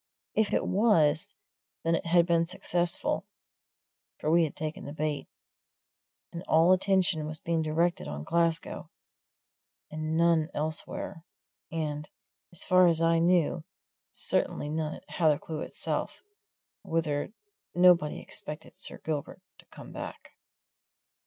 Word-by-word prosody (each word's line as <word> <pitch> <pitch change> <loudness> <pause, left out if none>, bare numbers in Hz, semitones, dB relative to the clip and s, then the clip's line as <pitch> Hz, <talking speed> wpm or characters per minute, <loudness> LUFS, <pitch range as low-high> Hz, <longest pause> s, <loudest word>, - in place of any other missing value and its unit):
If 220 -1 +2
it - - +1
was, 165 -8 +3 0.5
then 165 - +2
it 165 - -1
had 170 0 +5
been 170 -1 +2
successful, 175 0 -1 0.9
for 155 - 0
we 170 0 +5
had 150 - -6
taken 155 0 -5
the 145 - -6
bait, 150 -1 -2 1.1
and 170 - -5
all 165 +3 +5
attention 185 -4 +2
was 155 0 -5
being 165 -1 0
directed 165 +3 0
on 75 0 -5
Glasgow, 165 - 0 1.0
and 155 +1 -2
none 165 -1 +3
elsewhere, 155 +1 -3 0.5
and 150 -2 -3 0.4
as 175 - -4
far 185 0 +5
as 165 -2 +3
I 165 0 +3
knew 170 -1 +2 0.5
certainly 145 - -1
none 155 0 -2
at - - -15
Hathercleugh 155 -1 0
itself, - - -4 0.6
whither 160 -1 -1 0.4
nobody 175 -4 +5
expected 150 0 -5
Sir - - -5
Gilbert 155 +4 -4 0.2
to - - -17
come - - -12
back. - - -8
165 Hz, 125 wpm, -29 LUFS, 155-175 Hz, 1.1 s, had